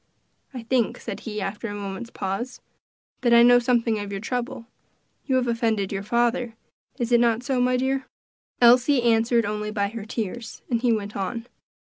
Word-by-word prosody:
"I 250 -4 -7
think," 235 -1 0
said - - -6
he, 210 -2 -5
after 205 +4 -4
a 205 - -5
moment's 200 +3 -6
pause, 205 +6 -4 0.6
"that 240 -2 +4
I 235 - +8
know 245 0 +7
something 235 -2 +1
of 205 -1 -5
your 195 - -3
trouble; 240 +1 -4 0.6
you 265 - +2
have 255 -1 +1
offended 225 -4 0
your 195 -1 -2
father; 235 +2 0 0.4
is 240 0 -2
it 240 - +6
not 235 0 +2
so, 255 -1 0
my 250 0 +2
dear?" 265 +1 -1 0.5
Elsie 245 +2 +5
answered 230 0 +3
only 210 +1 -3
by 200 -2 -1
her 225 0 -7
tears, 225 0 -5
and 230 -1 +1
he 245 -1 +3
went 210 -2 -2
on. 230 +4 -3
235 Hz, 185 wpm, -24 LUFS, 210-245 Hz, 0.6 s, I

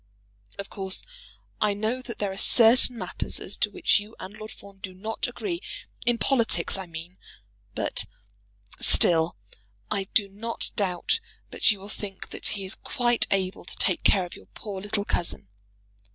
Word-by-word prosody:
Of 200 - -6
course 190 -2 0 0.6
I 210 -1 +3
know 220 +5 -1
that 240 -3 -7
there 205 -2 -1
are - - -6
certain 235 +4 +6
matters 185 -4 -3
as 195 - -3
to 210 - +2
which 205 - +3
you 210 +2 -10
and 195 +3 -8
Lord 215 0 -8
Fawn 200 -2 -14
do 185 -1 -7
not 220 +4 -2
agree, 345 -4 -3 0.5
in 240 -1 +5
politics, 230 -10 +3
I 190 -2 -4
mean; 170 +2 -9 0.6
but - - +1 0.7
still 165 -6 +3 0.5
I 195 - 0
do 205 -3 +5
not 215 +4 -3
doubt 195 - +1 0.3
but - - +5
you 205 -3 +4
will 195 - -9
think 205 -2 -6
that - - -3
he 195 - -4
is 190 - -2
quite 240 -2 +1
able 190 -1 0
to - - -6
take 185 - +2
care 190 -3 +4
of 175 - -9
your - - -14
poor 200 -3 -6
little 205 0 0
cousin. 170 - -1
200 Hz, 170 wpm, -27 LUFS, 190-225 Hz, 0.7 s, certain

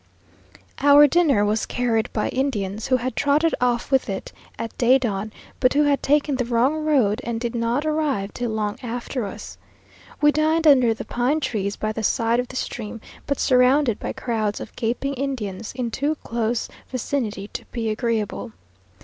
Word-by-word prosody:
Our 285 +1 +7
dinner 290 -8 +3
was 215 +1 0
carried 235 -3 0
by 215 - -1
Indians, 215 -6 -2
who 255 - +3
had 255 +1 -4
trotted 295 +3 +2
off 245 +1 0
with 265 -4 +2
it 190 -1 -5 0.2
at 230 - -5
day 250 +2 +5
dawn; 215 -4 -3 0.3
but 255 0 +3
who 295 +1 +4
had 285 -1 +2
taken 290 -1 +2
the 250 - 0
wrong 255 +6 +1
road, 255 -8 +2
and 230 -1 -3
did 235 0 -3
not 235 +5 0
arrive 300 -10 -1
till 245 -1 -3
long 215 -1 -2
after 245 -1 -4
us. - - -9 0.6
We 295 0 +5
dined 315 +2 +1
under 255 -6 +5
the - - -7
pine 255 +6 0
trees 205 -8 -2
by 215 - -2
the 225 - -4
side 230 +2 +1
of 250 - -1
the 255 - -11
stream, 225 -3 -4 0.3
but 280 - -1
surrounded 255 -1 +3
by - - -4
crowds 215 -4 -2
of - - -9
gaping 250 +4 -2
Indians, 230 -7 -4
in 245 -2 -2
too 290 +6 0
close 230 0 -1 0.2
vicinity 230 -5 -3
to - - -6
be 225 -2 -3
agreeable. 215 - -2
245 Hz, 175 wpm, -23 LUFS, 220-280 Hz, 0.6 s, Our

